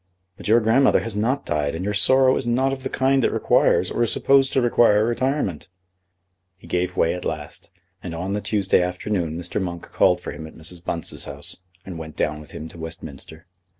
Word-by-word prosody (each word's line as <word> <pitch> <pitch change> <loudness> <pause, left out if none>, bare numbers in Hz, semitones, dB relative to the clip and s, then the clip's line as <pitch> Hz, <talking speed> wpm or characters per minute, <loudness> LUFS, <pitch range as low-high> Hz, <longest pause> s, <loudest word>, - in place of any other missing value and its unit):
"But - - -9
your 115 +3 +6
grandmother 120 +5 +4
has 115 -3 -5
not 125 +7 0
died, 75 -2 -1
and 90 +3 -4
your 105 - -1
sorrow 130 +5 +4
is 125 - -2
not 130 +3 +2
of 135 - -6
the 130 - -4
kind 135 0 +2
that - - +2
requires - - +2
or - - -1
is 120 - +2
supposed 135 -1 +3
to - - +3
require 115 -3 +4
retirement." 120 - -1 0.9
He - - -18
gave 90 0 -2
way 80 - +3
at 90 - -6
last, - - -5 0.3
and 85 -2 -6
on 90 +4 -3
the 105 - -1
Tuesday 100 -2 +2
afternoon 90 -2 -2
Mr. 90 +4 -3
Monk 85 -2 -4
called - - +3
for - - -6
him 80 - -8
at - - -14
Mrs. 85 +2 -5
Bunce's 85 -2 -4
house, - - -6 0.3
and 90 -4 -7
went 80 -1 -8
down 75 0 -1
with 75 - -13
him 80 - -7
to 85 - -13
Westminster. 80 0 -9
95 Hz, 210 wpm, -23 LUFS, 85-120 Hz, 0.9 s, your